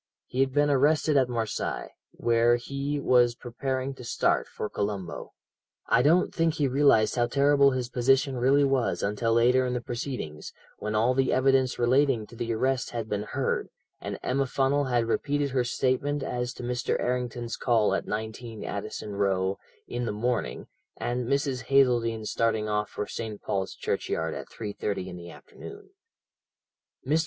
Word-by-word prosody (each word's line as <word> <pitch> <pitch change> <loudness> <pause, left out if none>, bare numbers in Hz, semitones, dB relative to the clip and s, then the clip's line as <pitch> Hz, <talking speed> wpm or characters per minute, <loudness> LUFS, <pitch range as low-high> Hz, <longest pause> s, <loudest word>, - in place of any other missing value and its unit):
"He 130 - -5
had 135 0 +3
been 145 +1 +3
arrested 150 +2 +3
at 130 -2 +3
Marseilles, 115 -3 -3 0.2
where 120 0 +2
he 140 +4 -3
was 120 -3 +4
preparing 130 +2 -3
to 130 - -11
start 120 - +1
for - - -5
Colombo. 100 -4 -4 0.5
"I 120 - +3
don't 165 +7 +3
think 165 -2 +1
he 150 -4 +1
realized 130 -5 +4
how 120 0 +3
terrible 140 +1 +4
his 130 -2 -2
position 130 +2 +2
really 135 +3 +4
was 135 -3 +1
until 105 +3 0
later 125 +3 +4
in 125 -1 -1
the - - 0
proceedings, 120 - -5 0.3
when 105 0 -3
all 115 +4 +3
the 135 0 +1
evidence 130 -1 +3
relating 125 -1 +2
to 115 - -14
the 115 0 -3
arrest 130 +3 0
had 115 -2 -5
been 105 -1 -1
heard, 105 - -2 0.3
and - - -5
Emma 135 +1 0
Funnel 140 +2 +1
had 120 -3 +1
repeated 145 +4 0
her 130 -1 +1
statement 130 +3 0
as 125 -1 -2
to - - -9
Mr. 125 0 -1
Errington's 120 -1 -2
call 115 -4 +2
at - - -2
19, 110 +1 -5
Addison 105 -1 -5
Row, 95 -1 0 0.3
in 120 0 -3
the 115 - -1
morning, 120 +3 -2 0.3
and 120 0 -2
Mrs. 140 -1 -1
Hazeldene 120 -5 +2
starting 110 -1 0
off 105 0 -1
for 105 - -4
St. 110 -2 -6
Paul's 95 -1 -3
Churchyard 80 0 -2
at - - -7
3.30 105 -3 -4
in 90 - -8
the 85 -1 -9
afternoon. 410 - -12 1.1
"Mr. 150 +5 +2
125 Hz, 165 wpm, -27 LUFS, 115-135 Hz, 1.1 s, was